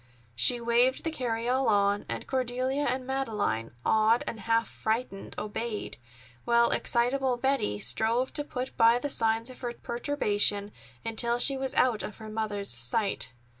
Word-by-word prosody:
She 120 Hz, -, +5 dB
waved 235 Hz, +2 st, +2 dB
the 325 Hz, -, -2 dB
carryall 250 Hz, -1 st, -1 dB
on, 200 Hz, -1 st, +1 dB
and -, -, -4 dB
Cordelia 260 Hz, +2 st, -1 dB
and 255 Hz, 0 st, -2 dB
Madeleine, 210 Hz, -, -2 dB
awed 220 Hz, +2 st, +3 dB
and 225 Hz, -, -5 dB
half 230 Hz, +3 st, +1 dB
frightened, 220 Hz, -2 st, -4 dB
obeyed, 215 Hz, -, -4 dB, 0.4 s
while 235 Hz, 0 st, +3 dB
excitable 250 Hz, +1 st, +1 dB
Betty 265 Hz, -, 0 dB
strove 220 Hz, -, +2 dB
to 295 Hz, -, -1 dB
put 255 Hz, -3 st, -6 dB
by 230 Hz, 0 st, +5 dB
the 285 Hz, +4 st, -3 dB
signs 225 Hz, -1 st, +1 dB
of 255 Hz, -, -14 dB
her 240 Hz, -2 st, -4 dB
perturbation 210 Hz, -6 st, -1 dB, 0.3 s
until 235 Hz, +1 st, +2 dB
she 270 Hz, +3 st, +6 dB
was 265 Hz, 0 st, -4 dB
out 240 Hz, -4 st, +2 dB
of 210 Hz, -, -7 dB
her 220 Hz, -1 st, -9 dB
mother's 210 Hz, -2 st, -2 dB
sight. 125 Hz, -, +1 dB
235 Hz, 150 wpm, -28 LUFS, 215-255 Hz, 0.4 s, she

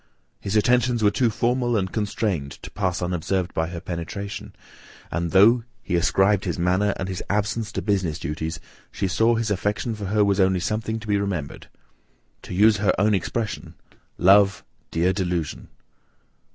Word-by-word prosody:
His 100 Hz, +1 st, -3 dB
attentions 120 Hz, +1 st, +2 dB
were 105 Hz, -, +5 dB
too 120 Hz, +3 st, +2 dB
formal 120 Hz, +1 st, 0 dB
and 95 Hz, -2 st, -1 dB
constrained 100 Hz, -9 st, -2 dB
to -, -, -8 dB
pass 95 Hz, -3 st, -1 dB
unobserved 90 Hz, +1 st, -1 dB
by 80 Hz, 0 st, 0 dB
her 85 Hz, 0 st, -6 dB
penetration, 90 Hz, +4 st, -6 dB, 0.6 s
and 85 Hz, 0 st, -1 dB
though 110 Hz, +7 st, +5 dB, 0.2 s
he 90 Hz, -, -1 dB
ascribed 95 Hz, +3 st, +2 dB
his -, -, -2 dB
manner, 90 Hz, +3 st, +1 dB
and 90 Hz, -, -3 dB
his 95 Hz, -2 st, -4 dB
absence, 105 Hz, +2 st, -1 dB
to -, -, -3 dB
business 95 Hz, -7 st, 0 dB
duties, 80 Hz, +2 st, -4 dB, 0.3 s
she 100 Hz, -, -2 dB
saw 110 Hz, +6 st, +2 dB
his 115 Hz, -2 st, -1 dB
affection 105 Hz, +4 st, -1 dB
for 105 Hz, -2 st, -6 dB
her 105 Hz, +2 st, +2 dB
was 100 Hz, 0 st, +1 dB
only 95 Hz, -1 st, +3 dB
something 110 Hz, +4 st, -2 dB
to 110 Hz, -, -10 dB
be 100 Hz, -1 st, +2 dB
remembered. 90 Hz, -8 st, -4 dB, 0.7 s
To 90 Hz, -, -7 dB
use 105 Hz, +2 st, +5 dB
her 105 Hz, 0 st, +1 dB
own 105 Hz, +2 st, +3 dB
expression, 100 Hz, -3 st, -3 dB, 0.4 s
"Love, 100 Hz, +2 st, +5 dB, 0.3 s
dear 90 Hz, +3 st, +1 dB
delusion! 90 Hz, -5 st, -3 dB
100 Hz, 165 wpm, -23 LUFS, 90-105 Hz, 0.7 s, were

